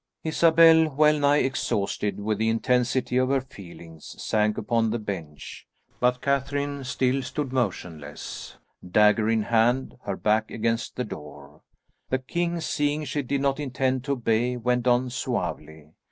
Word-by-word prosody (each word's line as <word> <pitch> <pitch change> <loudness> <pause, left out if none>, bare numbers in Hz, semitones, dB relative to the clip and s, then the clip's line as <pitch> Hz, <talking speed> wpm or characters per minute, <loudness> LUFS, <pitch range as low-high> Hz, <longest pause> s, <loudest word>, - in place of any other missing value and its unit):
Isabel, 160 0 +5
wellnigh 150 0 +3
exhausted 105 -6 -2
with 105 0 -2
the 110 0 +2
intensity 125 +2 +1
of 130 0 +2
her 135 0 +2
feelings, 85 - -12
sank 105 0 0
upon 115 -2 0
the 115 - -1
bench, 85 - -7 0.3
but 125 0 +1
Catherine 140 +1 -1
still 130 +1 0
stood 135 0 -4
motionless, 90 - -4 0.3
dagger 105 +4 +3
in 110 -1 +2
hand, 120 +4 +1
her 100 -2 -3
back 110 +1 +1
against 115 +1 -2
the 125 - -2
door. 75 - -10 0.5
The 130 - +1
king, 170 +6 -2
seeing 150 0 -1
she 145 - -2
did 140 +1 -2
not 140 0 0
intend 130 -2 -1
to 140 - 0
obey, 120 0 0
went 125 +1 0
on 125 +1 +2
suavely. 80 - -4
125 Hz, 140 wpm, -25 LUFS, 105-140 Hz, 0.5 s, Isabel